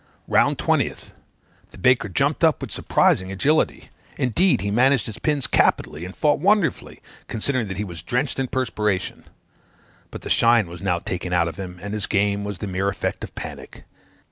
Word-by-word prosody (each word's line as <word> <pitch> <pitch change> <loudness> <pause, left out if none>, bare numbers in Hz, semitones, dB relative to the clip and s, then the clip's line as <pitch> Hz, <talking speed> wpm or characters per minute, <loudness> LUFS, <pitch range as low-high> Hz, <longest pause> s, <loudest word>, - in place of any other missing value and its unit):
"Round - - +3
20th. - - -1 0.6
The - - -15
baker 125 -5 +3
jumped 90 - 0
up - - +4
with - - -6
surprising 95 +1 +2
agility; 145 +11 0 0.3
indeed, 170 - +2
he 100 0 -2
managed 130 +3 +3
his 110 - -7
pins 145 -4 0
capitally, 80 +4 +1
and 95 - -9
fought 150 -1 +2
wonderfully, 200 -2 +1 0.2
considering 120 +1 -1
that 95 -1 -5
he 105 - -1
was 85 -6 -7
drenched 125 - -1
in 135 - 0
perspiration; 105 -7 -2 0.8
but - - -9
the - - -6
shine 115 -4 +4
was 85 0 -10
now 90 -3 +1
taken 90 0 -4
out 85 -1 +3
of 85 - -6
him, 90 -2 -6
and 100 +1 -5
his 105 -2 -2
game 100 0 +1
was 100 -2 -5
the 100 - -5
mere 95 0 -1
effect 100 - -3
of - - -8
panic. - - -9
105 Hz, 180 wpm, -23 LUFS, 95-130 Hz, 0.8 s, up